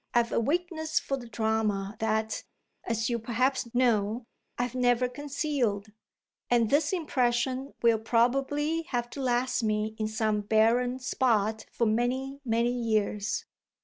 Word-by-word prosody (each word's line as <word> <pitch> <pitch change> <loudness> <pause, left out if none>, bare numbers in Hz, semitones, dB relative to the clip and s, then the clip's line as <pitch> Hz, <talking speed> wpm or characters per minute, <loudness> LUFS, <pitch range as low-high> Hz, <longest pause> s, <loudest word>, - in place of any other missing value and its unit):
I've 235 -1 +3
a - - +2
weakness 315 +4 0
for 275 - -2
the 245 -3 -8
drama 220 -3 -1
that, 220 0 -1 0.4
as 225 -1 -1
you 235 - 0
perhaps 245 +2 0
know, 230 -2 +2 0.3
I've 245 0 -1
never 250 -1 +2
concealed, 255 -6 -2 0.6
and 235 -3 +3
this 290 +1 +3
impression 260 -5 0
will 230 -2 +4
probably 275 +8 +1
have 240 -1 -2
to 280 - -6
last 250 0 +1
me 215 -1 0
in 215 - 0
some 215 -1 0
barren 230 +4 +2
spot 220 -4 0
for 235 - 0
many, 255 +5 0
many 235 -1 +1
years." 215 -3 -1
240 Hz, 135 wpm, -28 LUFS, 220-260 Hz, 0.6 s, will